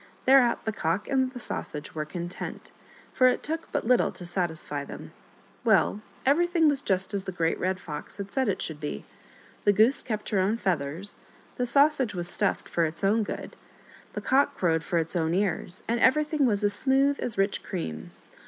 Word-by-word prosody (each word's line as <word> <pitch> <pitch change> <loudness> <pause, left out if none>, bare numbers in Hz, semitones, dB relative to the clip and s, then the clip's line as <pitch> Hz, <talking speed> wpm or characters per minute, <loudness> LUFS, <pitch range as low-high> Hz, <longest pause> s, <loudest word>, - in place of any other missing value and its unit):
Thereat 260 -2 +4
the 220 - 0
Cock 180 0 -2
and 260 -2 +1
the 250 - -8
Sausage 150 -9 -6
were 155 -1 -3
content, 175 +3 -7 0.4
for 255 - +5
it 250 - +1
took 320 +2 -4
but - - -2
little 250 +1 +3
to 175 - -5
satisfy 160 -5 -3
them. - - -9 0.5
Well, 210 - +3 0.2
everything 335 +3 +3
was 285 -2 +2
just 190 -1 0
as 195 -1 -3
the - - -4
Great 165 -2 -1
Red 185 +1 -1
Fox 150 0 -8
had 200 -1 -6
said 260 -4 0
it 195 - -1
should 155 -2 -3
be: 150 - -5 0.6
the 205 - +5
Goose 220 +7 +4
kept 215 -3 -4
her 205 - +1
own 200 +4 +1
feathers, 175 -1 -1 0.4
the 250 - 0
Sausage 275 -3 +3
was 175 -1 +2
stuffed 200 +2 -1
for 170 - 0
its 160 +4 -3
own 210 +3 +3
good, 210 - -5 0.6
the - - -4
Cock 275 +2 +2
crowed 165 -3 +1
for 170 - -1
its 165 +2 -1
own 165 0 +1
ears, 190 -2 -1
and 235 +1 0
everything 300 +1 +3
was 210 -2 0
as 205 0 +5
smooth 270 +5 +3
as 230 -5 +2
rich 195 +1 +1
cream. 80 - -5
200 Hz, 190 wpm, -27 LUFS, 175-255 Hz, 0.6 s, for